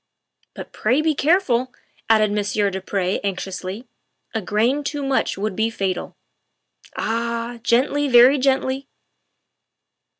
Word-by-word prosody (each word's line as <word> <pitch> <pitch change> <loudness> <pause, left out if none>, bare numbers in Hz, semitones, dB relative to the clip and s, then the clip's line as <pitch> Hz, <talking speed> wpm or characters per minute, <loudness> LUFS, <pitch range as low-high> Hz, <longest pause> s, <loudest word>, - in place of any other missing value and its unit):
" - - -44
But - - -9
pray 245 +6 +1
be 315 -1 +2
careful," 275 -6 +1 0.4
added 215 -2 +4
Monsieur 205 0 0
du 190 0 -4
Pre 190 0 -1
anx 195 -2 -3
iously, 190 +4 -6 0.2
" - - -48
a 220 - -1
grain 230 +9 0
too 290 0 -3
much 270 -7 0
would 205 0 -3
be 220 +2 +1
fatal. 195 -5 -3 0.8
Ah! 235 +1 -2
Gently 260 +5 +1
very 255 +2 +6
gently." 265 0 0
235 Hz, 135 wpm, -21 LUFS, 205-265 Hz, 0.8 s, very